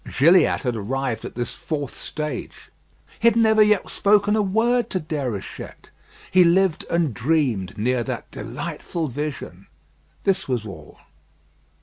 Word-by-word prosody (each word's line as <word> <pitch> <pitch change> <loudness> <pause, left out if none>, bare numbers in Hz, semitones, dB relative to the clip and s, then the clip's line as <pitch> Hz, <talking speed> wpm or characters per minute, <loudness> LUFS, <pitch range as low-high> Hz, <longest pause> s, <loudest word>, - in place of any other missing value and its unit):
Gilliatt 170 +7 +5
had 125 -3 -1
arrived 120 +2 -3
at - - -8
this 120 -1 -3
fourth 155 -5 -4
stage. 150 -5 -6 0.5
He 230 - +3
had 230 - +5
never 220 -1 +4
yet 210 -1 +3
spoken 205 +1 +3
a 215 - +2
word 230 +5 +1
to 185 - -1
Déruchette. 140 - -6 0.4
He 185 0 +6
lived 175 0 +3
and 170 -6 +1
dreamed 120 - 0
near 125 +3 +1
that - - -5
delightful 165 -4 -5
vision. 130 - -6 0.6
This 190 -1 +1
was 125 -5 -1
all. 80 -7 -10
155 Hz, 135 wpm, -23 LUFS, 125-190 Hz, 0.6 s, He